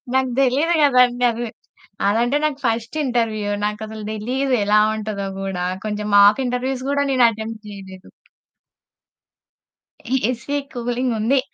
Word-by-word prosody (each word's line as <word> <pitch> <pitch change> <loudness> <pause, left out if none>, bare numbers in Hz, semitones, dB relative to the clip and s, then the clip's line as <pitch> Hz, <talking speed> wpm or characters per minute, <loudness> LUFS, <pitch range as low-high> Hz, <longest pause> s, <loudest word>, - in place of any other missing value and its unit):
నాకు 265 -1 +2
తెలిదు 280 +6 +2
కదా 270 -3 +4
అండి, 245 0 -1
అది 235 +1 -4 0.6
అదంటే 240 +6 +2
నాకు 295 -3 -1
ఫస్ట్ 230 +4 -1
ఇంటర్వ్యూ 225 -4 -1
నాకసలు 215 +1 -5
తెలీదు 255 +5 -1
ఎలా 210 +1 +4 0.2
ఉంటదో 210 -2 -4
కూడా. 190 -2 -3 0.2
కొంచెం 210 0 -3
మాక్ 205 +6 +6
ఇంటర్వ్యూస్ 255 +1 -2
కూడా 285 0 +1
నేను 255 -2 +5
అటెంప్ట్ 220 0 -6
చేయలేదు. 190 -2 -11 2.2
ఏసీ 265 +4 -3 0.2
కూలింగ్ 245 +1 -1
ఉంది, 250 +6 +2
235 Hz, 125 wpm, -21 LUFS, 210-260 Hz, 2.2 s, మాక్